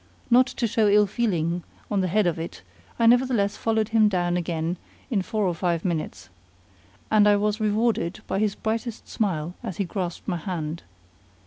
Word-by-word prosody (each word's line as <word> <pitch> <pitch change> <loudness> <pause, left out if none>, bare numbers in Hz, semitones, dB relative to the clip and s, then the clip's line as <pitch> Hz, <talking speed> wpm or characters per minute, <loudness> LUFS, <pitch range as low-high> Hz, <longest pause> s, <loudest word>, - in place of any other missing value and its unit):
Not 250 +2 +6
to 240 - -2
show 220 -1 +2
ill 210 +1 +5
feeling 180 -6 -1 0.3
on 200 -2 +2
the 185 - 0
head 205 +3 +2
of 170 -2 0
it, 165 - -7 0.3
I 230 - +2
nevertheless 240 -4 +3
followed 220 -1 0
him 220 -2 +4
down 175 -2 0
again 170 0 -2 0.3
in 205 -5 +2
four 210 +2 -1
or 180 - +1
five 170 0 -1
minutes. 160 - -3 0.8
And 210 -1 +5
I 205 - +6
was 210 +1 0
rewarded 215 -4 0
by 195 - -1
his 210 -1 +1
brightest 225 +1 -3
smile 175 -6 -2
as 215 -8 -6
he 200 - 0
grasped 180 -1 -4
my 180 -4 0
hand. 165 -2 -4
200 Hz, 180 wpm, -25 LUFS, 175-220 Hz, 0.8 s, Not